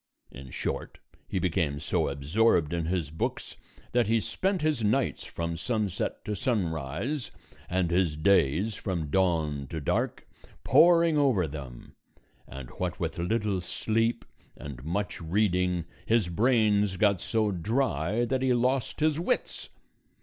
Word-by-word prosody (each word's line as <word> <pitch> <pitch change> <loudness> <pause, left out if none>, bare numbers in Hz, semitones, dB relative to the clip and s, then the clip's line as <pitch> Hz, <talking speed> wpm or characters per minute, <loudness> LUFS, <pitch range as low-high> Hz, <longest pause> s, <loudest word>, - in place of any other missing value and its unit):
In 65 0 -10
short, - - -4 0.3
he - - -3
became 80 -5 0
so 75 - 0
absorbed 75 +4 +2
in 85 -1 -1
his 85 -4 -1
books 80 - -3 0.4
that 120 -3 +2
he 115 +1 +3
spent 190 - -1
his 150 -7 +1
nights 125 +5 0
from 85 0 -4
sunset 105 0 -2
to 105 - -2
sunrise, 95 - -2 0.4
and 90 -1 0
his 85 -3 +2
days 95 +3 +3
from 85 -7 -3
dawn 80 -7 +1
to 80 - -5
dark, 70 - -1 0.4
poring 170 -2 +5
over 125 - +3
them; 70 -5 -9 0.5
and 65 -2 -9
what - - -2
with - - -3
little 105 +1 0
sleep 115 +6 -1 0.3
and 65 -4 -8
much 90 +6 -3
reading 90 -1 +1 0.2
his 110 -5 +2
brains 105 -1 +2
got 100 -1 +3
so 110 -2 0
dry 105 - 0
that 130 +1 -1
he 130 -2 +3
lost 125 +3 0
his 155 0 +2
wits. 190 +9 -2
95 Hz, 135 wpm, -28 LUFS, 80-115 Hz, 0.5 s, poring